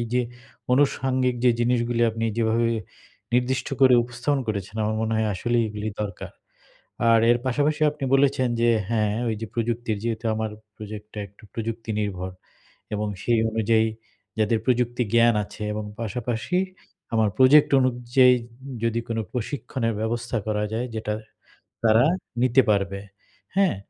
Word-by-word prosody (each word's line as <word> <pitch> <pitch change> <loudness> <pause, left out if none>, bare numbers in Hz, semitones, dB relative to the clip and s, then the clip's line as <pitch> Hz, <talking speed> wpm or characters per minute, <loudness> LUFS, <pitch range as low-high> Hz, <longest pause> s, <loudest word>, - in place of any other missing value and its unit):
যে 125 - +4 0.5
আনুষঙ্গিক 130 -2 +2
যে 125 - +7
জিনিসগুলি 120 0 +1
আপনি 115 +1 -3
যেভাবে 115 0 +2 0.7
নির্দিষ্ট 125 +3 +1
করে 130 -1 +7
উপস্থাপন 125 +4 -1
করেছেন 100 0 -3
আমার 110 +1 0
মনে 110 0 -1
হয় 110 - +1
আসলেই 120 +5 +1
এগুলি 105 0 -4
দরকার। 100 -3 -5 0.8
আর 115 - +6
এর 120 - +4
পাশাপাশি 145 +4 +1
আপনি 145 -2 -6
বলেছেন 135 -2 +3
যে, 120 - +4 0.2
হ্যাঁ 110 -2 +1 0.2
ওই 110 - 0
যে 115 - -4
প্রযুক্তির 115 -1 -1
যেহেতু 115 0 -2
আমার 110 0 -2 0.3
প্রজেক্টটা 105 0 -9
একটু 100 +4 -24
প্রযুক্তি 115 0 -4
নির্ভর 95 -3 -3 0.6
এবং 105 0 -1 0.2
সেই 120 -1 +2
অনুযায়ী 110 0 +2 0.5
যাদের 110 +1 +2
প্রযুক্তি 125 0 +1
জ্ঞান 115 -1 +5
আছে 105 - -12
এবং 105 - -3 0.2
পাশাপাশি 120 - -2 0.6
আমার 110 -2 +3
প্রজেক্ট 140 +3 +7
অনুযায়ী 125 0 +4 0.5
যদি 115 0 +1
কোন 115 -1 -2 0.2
প্রশিক্ষণের 125 -1 -2
ব্যবস্থা 115 +1 -2
করা 105 -1 0
যায় 120 +3 -1
যেটা 110 -1 -2 0.7
তারা 110 +3 +5 0.4
নিতে 130 +1 +5
পারবে, 100 -1 0 0.6
হ্যাঁ? 195 - +3
115 Hz, 140 wpm, -24 LUFS, 110-125 Hz, 0.8 s, যে